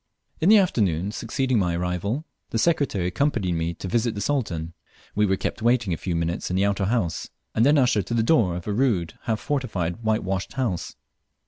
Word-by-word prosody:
In 165 Hz, -, +3 dB
the 220 Hz, -, +9 dB
afternoon 100 Hz, -, +1 dB
succeeding 120 Hz, +2 st, 0 dB
my 90 Hz, -3 st, +1 dB
arrival, 90 Hz, -, -2 dB, 0.2 s
the -, -, -2 dB
Secretary 140 Hz, -, +1 dB
accompanied 100 Hz, -1 st, 0 dB
me 85 Hz, 0 st, -1 dB
to 95 Hz, -, -6 dB
visit 115 Hz, +4 st, 0 dB
the 100 Hz, -, -3 dB
Sultan. 90 Hz, -, -1 dB, 0.4 s
We 105 Hz, 0 st, +2 dB
were 95 Hz, -, +2 dB
kept -, -, -3 dB
waiting 115 Hz, -5 st, +2 dB
a -, -, -2 dB
few 90 Hz, 0 st, -3 dB
minutes 85 Hz, +1 st, -2 dB
in 90 Hz, -, 0 dB
an 95 Hz, -, +3 dB
outer 100 Hz, -1 st, +1 dB
gate -, -, 0 dB
house, 105 Hz, -9 st, -1 dB, 0.2 s
and 110 Hz, -, +2 dB
then 145 Hz, +4 st, +5 dB
ushered 125 Hz, -7 st, +2 dB
to 115 Hz, -, -1 dB
the 115 Hz, -, +2 dB
door 110 Hz, -, +3 dB
of 85 Hz, -, -6 dB
a 105 Hz, -, -1 dB
rude, 100 Hz, -9 st, +1 dB
half 110 Hz, -2 st, 0 dB
fortified 100 Hz, -, -2 dB
whitewashed 100 Hz, -4 st, -1 dB
house. 115 Hz, -11 st, -2 dB
105 Hz, 205 wpm, -24 LUFS, 90-125 Hz, 0.4 s, the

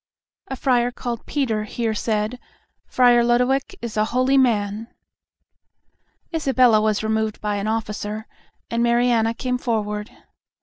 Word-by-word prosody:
A 265 Hz, -, -4 dB
friar 245 Hz, -2 st, +2 dB
called 240 Hz, -2 st, -6 dB
Peter 225 Hz, -7 st, -1 dB
here 225 Hz, +1 st, -2 dB
said, 215 Hz, +2 st, -2 dB, 0.5 s
"Friar 245 Hz, -1 st, +4 dB
Lodowick 250 Hz, +3 st, +1 dB
is 235 Hz, -2 st, -5 dB
a 215 Hz, -, +3 dB
holy 255 Hz, +4 st, +1 dB
man." 220 Hz, -4 st, +1 dB, 1.5 s
Isabella 255 Hz, -8 st, +3 dB
was 215 Hz, -1 st, 0 dB
removed 220 Hz, 0 st, -1 dB
by 210 Hz, -1 st, -2 dB
an 200 Hz, +1 st, -3 dB
officer, 215 Hz, -1 st, -3 dB, 0.5 s
and 230 Hz, 0 st, 0 dB
Mariana 235 Hz, -1 st, +2 dB
came 250 Hz, +1 st, -2 dB
forward. 210 Hz, -3 st, -2 dB
230 Hz, 125 wpm, -22 LUFS, 215-250 Hz, 1.5 s, Friar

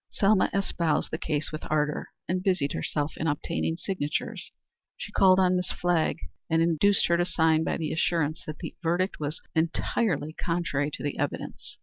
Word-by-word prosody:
Selma 200 Hz, -1 st, +3 dB
espoused 170 Hz, -5 st, 0 dB
the 160 Hz, -, -1 dB
case 155 Hz, -1 st, -2 dB
with 155 Hz, -, -5 dB
ardor, 150 Hz, -1 st, 0 dB, 0.2 s
and 185 Hz, +1 st, 0 dB
busied 180 Hz, -7 st, +1 dB
herself 145 Hz, -, -1 dB
in 160 Hz, -, -1 dB
obtaining 160 Hz, +2 st, -1 dB
signatures. 165 Hz, -6 st, -3 dB, 0.5 s
She -, -, -7 dB
called 190 Hz, -2 st, +5 dB
on 185 Hz, -1 st, +4 dB
Miss 180 Hz, -1 st, -1 dB
Flagg 175 Hz, -3 st, +1 dB, 0.3 s
and 165 Hz, 0 st, +3 dB
induced 170 Hz, +4 st, +4 dB
her 170 Hz, -, +3 dB
to 175 Hz, -, +3 dB
sign 160 Hz, -2 st, +3 dB
by -, -, -1 dB
the 160 Hz, -2 st, -2 dB
assurance 160 Hz, -2 st, 0 dB
that 155 Hz, -, -5 dB
the -, -, -6 dB
verdict 180 Hz, +3 st, 0 dB
was 150 Hz, +1 st, -3 dB
entirely 160 Hz, -1 st, 0 dB
contrary 165 Hz, -5 st, -1 dB
to -, -, -8 dB
the 145 Hz, -, -3 dB
evidence. 145 Hz, 0 st, -4 dB
165 Hz, 175 wpm, -27 LUFS, 150-180 Hz, 0.5 s, called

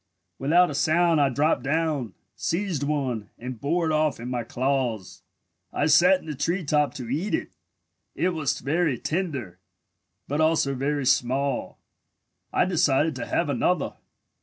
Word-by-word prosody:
Without 170 Hz, +5 st, +4 dB
a -, -, -4 dB
sound 160 Hz, +2 st, +3 dB
I 140 Hz, -, +4 dB
dropped 145 Hz, +5 st, +1 dB
down, 145 Hz, -, -1 dB, 0.2 s
seized 175 Hz, -4 st, -2 dB
one, 135 Hz, -8 st, -2 dB
and 125 Hz, -1 st, -7 dB
bore 165 Hz, +4 st, 0 dB
it 160 Hz, -, 0 dB
off 155 Hz, -3 st, +1 dB
in 120 Hz, +2 st, -6 dB
my 120 Hz, -2 st, -2 dB
claws. 125 Hz, -5 st, -2 dB, 0.5 s
I 145 Hz, -, 0 dB
sat 175 Hz, +5 st, +5 dB
in -, -, -16 dB
the 155 Hz, -, -4 dB
tree 165 Hz, +6 st, -1 dB
top 150 Hz, 0 st, +1 dB
to 125 Hz, -3 st, -6 dB
eat 155 Hz, -, -1 dB
it. -, -, -5 dB, 0.6 s
It 185 Hz, -, +1 dB
was 155 Hz, -6 st, -2 dB
very 150 Hz, -1 st, 0 dB
tender, 140 Hz, -, -3 dB, 0.7 s
but 145 Hz, +3 st, -1 dB
also 155 Hz, -3 st, +2 dB
very 140 Hz, +1 st, -1 dB
small. 130 Hz, +2 st, 0 dB, 0.7 s
I -, -, +2 dB
decided 160 Hz, -3 st, +2 dB
to -, -, -5 dB
have -, -, 0 dB
another. -, -, 0 dB
145 Hz, 155 wpm, -25 LUFS, 130-160 Hz, 0.7 s, sat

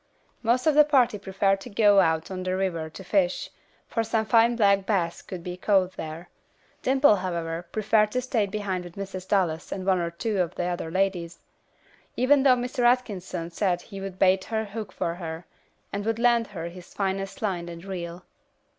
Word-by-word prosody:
Most 240 Hz, +2 st, +1 dB
of 310 Hz, -, +4 dB
the 300 Hz, +1 st, +8 dB
party 255 Hz, -7 st, +3 dB
preferred 195 Hz, 0 st, 0 dB
to 245 Hz, -, -9 dB
go 205 Hz, -2 st, +5 dB
out 160 Hz, -1 st, +1 dB
on 185 Hz, -1 st, -4 dB
the 185 Hz, 0 st, -1 dB
river 170 Hz, -5 st, -2 dB
to 190 Hz, -, -10 dB
fish, 185 Hz, -1 st, 0 dB, 0.4 s
for 230 Hz, -, -1 dB
some 225 Hz, 0 st, 0 dB
fine 230 Hz, +2 st, +4 dB
black 200 Hz, -3 st, +3 dB
bass 175 Hz, -6 st, 0 dB
could 180 Hz, -3 st, -8 dB
be 180 Hz, 0 st, -5 dB
caught 190 Hz, -1 st, +2 dB
here. 160 Hz, +1 st, -7 dB, 0.5 s
Dimple, 265 Hz, -4 st, +4 dB
however, 170 Hz, -2 st, -3 dB
preferred 215 Hz, 0 st, +2 dB
to 255 Hz, -, +1 dB
stay 230 Hz, -5 st, 0 dB
behind 195 Hz, -3 st, -3 dB
with 175 Hz, -1 st, -11 dB
Mrs. 190 Hz, -2 st, -6 dB
Dallas 175 Hz, -5 st, 0 dB
and 190 Hz, -1 st, -4 dB
one 190 Hz, -2 st, +3 dB
or 170 Hz, -1 st, -1 dB
two 200 Hz, +4 st, -2 dB
of 175 Hz, 0 st, -2 dB
the -, -, -2 dB
other 175 Hz, -2 st, -3 dB
ladies, 180 Hz, -2 st, -1 dB, 0.8 s
even 270 Hz, +3 st, +4 dB
though 265 Hz, -2 st, +6 dB
Mr. 250 Hz, +2 st, -4 dB
Atkinson 195 Hz, -9 st, 0 dB
said 175 Hz, -1 st, 0 dB
he 195 Hz, -2 st, -9 dB
would 195 Hz, -1 st, -6 dB
bait 190 Hz, 0 st, +3 dB
her 220 Hz, -1 st, -2 dB
hook 210 Hz, -1 st, -6 dB
for 170 Hz, -, -2 dB
her, 165 Hz, -1 st, -6 dB, 0.5 s
and 200 Hz, 0 st, -2 dB
would 225 Hz, +1 st, -1 dB
lend 235 Hz, -1 st, +3 dB
her 165 Hz, -, -6 dB
his 175 Hz, 0 st, -13 dB
finest 195 Hz, +5 st, -2 dB
line 175 Hz, -4 st, -2 dB
and 170 Hz, +1 st, -9 dB
reel. 175 Hz, -2 st, -6 dB
195 Hz, 190 wpm, -26 LUFS, 175-220 Hz, 0.8 s, the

